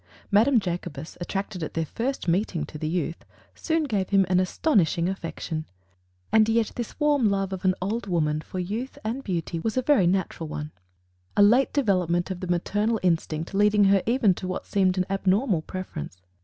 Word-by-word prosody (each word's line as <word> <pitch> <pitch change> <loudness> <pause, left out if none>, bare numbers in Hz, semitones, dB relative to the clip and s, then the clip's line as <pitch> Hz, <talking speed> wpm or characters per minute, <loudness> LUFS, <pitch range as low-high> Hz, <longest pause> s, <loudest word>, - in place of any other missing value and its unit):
Madame 230 +5 +5
Jacobus, 175 -4 -5
attracted 195 0 -4
at 155 - -5
their 165 -1 0
first 245 - -3
meeting 170 -3 0
to 155 - -9
the 155 - -2
youth, 170 0 -2 0.3
soon 325 -1 0
gave 205 -9 -1
him 195 -1 +4
an 180 0 +4
astonishing 185 - +2
affection. 165 -4 -4 0.7
And 220 0 +5
yet 225 -1 +2
this 240 +4 -6
warm 290 -7 +3
love 195 -1 -1
of 190 - -5
an 185 0 +3
old 215 +3 -2
woman 155 -4 0
for 185 - -8
youth 215 +9 -4
and 235 +5 -3
beauty 170 -4 -3
was 220 +8 -2
a 255 - +2
very 245 -10 +4
natural 175 -3 -1
one 150 0 -5 0.7
a 205 - +7
late 240 +6 +5
development 185 - +1
of 185 - -4
the 185 - -5
maternal 205 +6 0
instinct 165 -1 0
leading 210 +1 +4
her 195 -1 +4
even 230 -5 +4
to 185 - -6
what 185 - -4
seemed 190 -2 +1
an 185 - +1
abnormal 195 - +1
preference. 155 - -7
190 Hz, 185 wpm, -25 LUFS, 175-220 Hz, 0.7 s, a